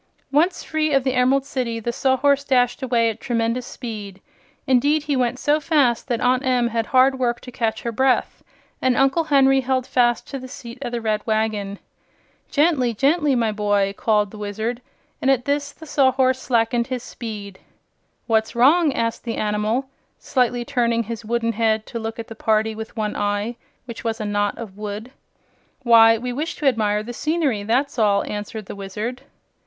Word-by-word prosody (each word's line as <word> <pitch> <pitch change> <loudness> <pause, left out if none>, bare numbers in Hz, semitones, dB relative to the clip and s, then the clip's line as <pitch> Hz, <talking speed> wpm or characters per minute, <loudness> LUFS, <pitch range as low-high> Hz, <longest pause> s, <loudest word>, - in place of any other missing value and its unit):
Once 325 +6 +2
free 310 -1 -1
of 270 -2 +3
the 260 -1 0
Emerald 260 +2 +2
City 245 -4 -3
the 235 +2 -3
Sawhorse 275 +2 +2
dashed 250 -2 +1
away 235 -3 +2
at 225 - -11
tremendous 235 0 -1
speed. 210 -6 -7 0.5
Indeed, 285 +4 +3
he 295 -2 -1
went 250 -1 0
so 295 +3 +2
fast 280 -7 +1
that 240 -3 -1
Aunt 250 +1 +2
Em 250 -3 +2
had 230 -1 -2
hard 260 +1 +4
work 240 -1 0
to 250 - -10
catch 230 -3 -2
her 235 - -2
breath, 260 +3 +1 0.4
and 255 -1 +2
Uncle 270 +5 +3
Henry 270 -2 +4
held 260 0 0
fast 240 -2 +1
to 275 - -5
the 260 - -9
seat 235 -1 -10
of 245 -3 -4
the 240 -1 -3
red 215 -1 0
wagon. 215 -2 -1 0.7
"Gently 285 -6 +2
gently, 290 +3 +2
my 230 -3 +1
boy!" 205 -2 +1
called 210 -2 +1
the 215 - -10
Wizard, 220 +4 -3 0.4
and 265 - +1
at 260 -2 +2
this 285 0 -1
the 320 - -13
Sawhorse 260 -3 +2
slackened 235 -1 +1
his 255 -2 -4
speed. 205 -4 -8 0.7
"What's 220 0 0
wrong?" 295 +6 +5
asked 230 -1 -2
the 230 -2 -4
animal, 215 +5 0 0.3
slightly 245 -2 0
turning 235 -3 +1
his 230 +1 -6
wooden 230 +1 0
head 220 -1 0
to 235 - -6
look 225 0 -5
at 230 - -6
the - - -8
party 220 0 +1
with 220 +1 -8
one 210 -1 -2
eye, 205 +3 -1 0.3
which 235 -2 -8
was 225 0 -2
a 215 - -3
knot 205 0 -1
of 215 -5 -8
wood. 210 +3 -6 0.7
"Why, 225 -1 +7
we 245 +2 -4
wish 310 +5 -3
to 300 - -6
admire 210 -5 +2
the 240 +2 -7
scenery, 305 -6 0
that's 245 +6 0
all," 200 -2 +3
answered 210 +1 -6
the - - -8
Wizard. 210 +6 -5
240 Hz, 185 wpm, -22 LUFS, 220-265 Hz, 0.7 s, Why